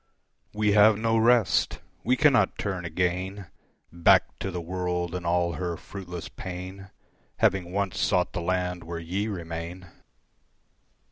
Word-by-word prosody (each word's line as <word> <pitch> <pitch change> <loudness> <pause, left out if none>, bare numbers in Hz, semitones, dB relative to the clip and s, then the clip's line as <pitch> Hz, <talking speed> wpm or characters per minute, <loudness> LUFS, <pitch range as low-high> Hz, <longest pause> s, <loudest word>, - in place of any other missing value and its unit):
We 105 0 +1
have 105 +1 +6
no 115 +1 +1
rest. 115 -3 +3 0.3
We 125 +3 +3
cannot 125 -10 +4
turn 95 -4 -3
again 90 +3 -2 0.5
Back 85 0 +5 0.2
to 95 - -3
the 90 -1 -4
world 90 0 -2
and 90 -1 -4
all 85 0 +1
her 85 +2 -3
fruitless 90 -4 -8
pain, 95 +2 -8 0.5
Having 90 -2 +2
once 100 -1 -1
sought 90 -1 +1
the 85 - -2
land 90 0 -1
where 85 +1 -5
ye 90 +6 -2
remain. 85 -2 -6
90 Hz, 135 wpm, -27 LUFS, 85-100 Hz, 0.5 s, have